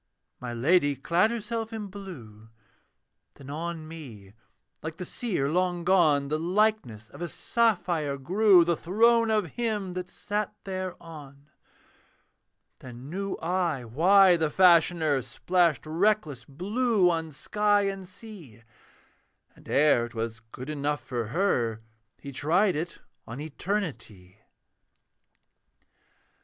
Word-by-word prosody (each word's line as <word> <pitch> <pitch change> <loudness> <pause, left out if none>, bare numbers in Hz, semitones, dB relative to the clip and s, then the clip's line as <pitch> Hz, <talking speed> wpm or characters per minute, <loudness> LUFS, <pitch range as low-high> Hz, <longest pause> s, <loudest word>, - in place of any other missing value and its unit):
My 125 -1 -6
Lady 145 +4 +2
clad 170 - +2
herself 225 0 -4
in 220 -2 -5
blue, 140 - -11 0.9
Then 140 0 -11
on 160 +1 -5
me, 120 -12 -11 0.5
like 160 +1 -6
the 180 - -6
seer 185 - -2
long 175 +2 0
gone, 160 -6 +3
The 155 +2 -1
likeness 175 - 0
of - - -12
a 175 - -2
sapphire 175 -10 0
grew, 185 +5 +4
The 170 0 +1
throne 230 +7 +3
of 210 -8 0
him 210 -6 -2
that 180 0 -5
sat 210 0 -4
thereon. 165 -7 -8 1.3
Then 130 +2 -10
knew 195 +2 -3
I 170 -7 -1
why 180 - +5
the 160 -2 0
Fashioner 170 -4 +4
Splashed 160 +4 0
reckless 160 - 0
blue 200 - +1
on 165 -1 -2
sky 205 +7 +1
and 195 -2 -4
sea; 185 - -13 0.9
And - - -17
ere 140 -5 +3
'twas 115 -1 -5
good 130 +4 -7
enough 145 -3 -2
for 120 -3 -4
her, 120 - 0 0.4
He 140 - -9
tried 175 +8 +1
it 165 +3 -4 0.3
on 115 +4 -7
Eternity. 145 - -5
170 Hz, 120 wpm, -27 LUFS, 140-195 Hz, 1.3 s, why